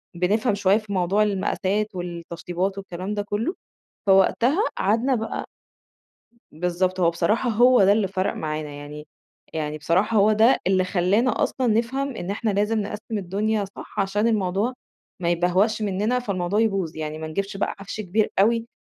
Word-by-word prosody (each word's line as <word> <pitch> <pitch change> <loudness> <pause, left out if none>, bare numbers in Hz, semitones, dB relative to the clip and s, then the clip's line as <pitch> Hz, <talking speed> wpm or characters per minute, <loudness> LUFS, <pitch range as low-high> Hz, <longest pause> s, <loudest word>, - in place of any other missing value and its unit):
بنفْهم 205 +6 +1
شوية 200 0 +3
في 215 -2 -6
موضوع 190 +3 +2
المقاسات 200 0 -1
والتشطيبات 175 +2 -4
والكلام 190 0 -5
ده 205 - -1
كلّه، 210 - -2 0.5
فوقتها 230 - +4
قعدنا 230 +7 +2
بقى 225 -2 -3 1.1
بالضبط، 180 +3 -1
هو 170 -2 +4
بصراحة 210 +9 +1
هو 240 0 +5
ده 195 - +6
اللي 205 -2 +1
فَرَق 190 +1 -1
معانا 155 -1 -4
يعني 145 +1 -9 0.5
يعني 155 -1 -3
بصراحة 185 +8 +1
هو 210 +1 +5
ده 225 +4 +5
اللي 185 0 +3
خلانا 195 +7 +1
أصلًا 260 - 0
نفْهم 245 +4 0
إن 175 - -5
إحنا 215 +2 -1
لازم 210 +2 +1
نقسِّم 210 +2 -4
الدنيا 205 +3 -1
صح، - - -5
عشان 205 +3 +1
الموضوع 210 +2 0 0.5
ما 170 -1 0
يِبَهْوَقْش 185 +6 +2
منّنا، 210 +4 0
فالموضوع 200 -4 -1
يبوظ، 195 -8 0
يعني 155 0 -4
ما 160 - -5
نجيبش 195 +5 -3
بقى 195 - -1
عَفْش 195 +2 -6
كبير 210 +2 0
أوي، 230 +3 +3
200 Hz, 155 wpm, -24 LUFS, 180-220 Hz, 1.1 s, ده